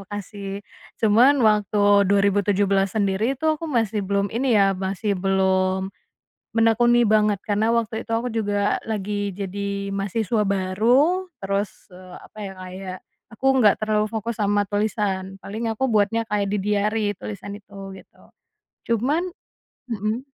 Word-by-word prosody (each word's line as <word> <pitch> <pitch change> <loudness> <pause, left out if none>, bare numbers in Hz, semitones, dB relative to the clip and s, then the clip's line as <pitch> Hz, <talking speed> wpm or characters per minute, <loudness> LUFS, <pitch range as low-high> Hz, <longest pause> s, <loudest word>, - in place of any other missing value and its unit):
makasih, 200 0 -7 0.3
cuman 240 +4 +4
waktu 205 -1 +3
2017 200 0 +2
sendiri 210 +6 +1
tuh 310 +3 0
aku 330 - -4
masih 225 -5 0
belum 200 +1 -1
ini 240 -1 +2
ya 195 -1 +4
masih 195 +2 -2
belum, 190 0 +1 0.6
menekuni 240 +1 +4
banget 210 -1 +3
karena 215 +2 +1
waktu 230 -1 0
itu - - -6
aku 235 0 -2
juga 205 -2 0
lagi 205 -1 -2
jadi 200 0 -4
mahasiswa 205 +2 -1
baru 240 - +2
terus 200 +1 -1 0.2
e 180 - -12 0.2
apa - - -17
ya 195 - -8
kayak, 185 0 -7 0.4
aku 265 - -6
nggak 210 -4 +5
terlalu 215 0 +1
fokus 225 +1 -4
sama 205 0 +2
tulisan 205 -2 -1
paling 220 +3 -4
aku 245 +4 -1
buatnya 220 +2 +2
kayak 205 -2 -1
di 210 - 0
diary 210 +1 +1
tulisan 205 -1 -7
itu 200 -1 -18 0.2
gitu, - - -18 0.7
cuman, 265 +9 +1 0.7
mhm. 220 +3 -2
205 Hz, 135 wpm, -23 LUFS, 195-225 Hz, 0.7 s, nggak